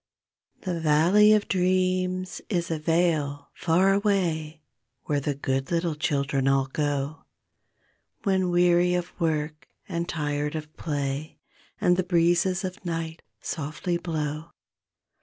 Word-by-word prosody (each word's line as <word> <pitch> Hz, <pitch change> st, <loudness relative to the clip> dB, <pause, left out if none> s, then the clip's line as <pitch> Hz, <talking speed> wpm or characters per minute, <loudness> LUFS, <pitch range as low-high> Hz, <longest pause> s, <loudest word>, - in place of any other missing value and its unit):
C 180 Hz, -, -1 dB
he 170 Hz, -, -2 dB
valley 165 Hz, +7 st, +5 dB
of 215 Hz, -1 st, +3 dB
dreams 185 Hz, 0 st, 0 dB
is 175 Hz, -5 st, -1 dB
a 160 Hz, -, -1 dB
vale, 155 Hz, -3 st, 0 dB
far 185 Hz, +4 st, +3 dB
away, 170 Hz, -7 st, 0 dB, 0.4 s
Where 145 Hz, -1 st, 0 dB
the 140 Hz, 0 st, -2 dB
good 135 Hz, -1 st, -2 dB
little 170 Hz, -1 st, 0 dB
children 140 Hz, -2 st, 0 dB
all 135 Hz, 0 st, +3 dB
go 145 Hz, +2 st, -2 dB, 1.0 s
When 190 Hz, -3 st, +2 dB
weary 175 Hz, 0 st, +4 dB
of 180 Hz, 0 st, -3 dB
work 155 Hz, -1 st, -1 dB, 0.2 s
and 170 Hz, -2 st, -3 dB
tired 150 Hz, -1 st, -2 dB
of 155 Hz, 0 st, -6 dB
play, 145 Hz, 0 st, -3 dB, 0.4 s
And 180 Hz, 0 st, +3 dB
the 185 Hz, -, +2 dB
breezes 175 Hz, +1 st, +2 dB
of 185 Hz, -1 st, -5 dB
night 165 Hz, -2 st, -4 dB, 0.2 s
softly 155 Hz, +3 st, -2 dB
blow. 155 Hz, -1 st, -3 dB
165 Hz, 125 wpm, -26 LUFS, 150-180 Hz, 1.0 s, valley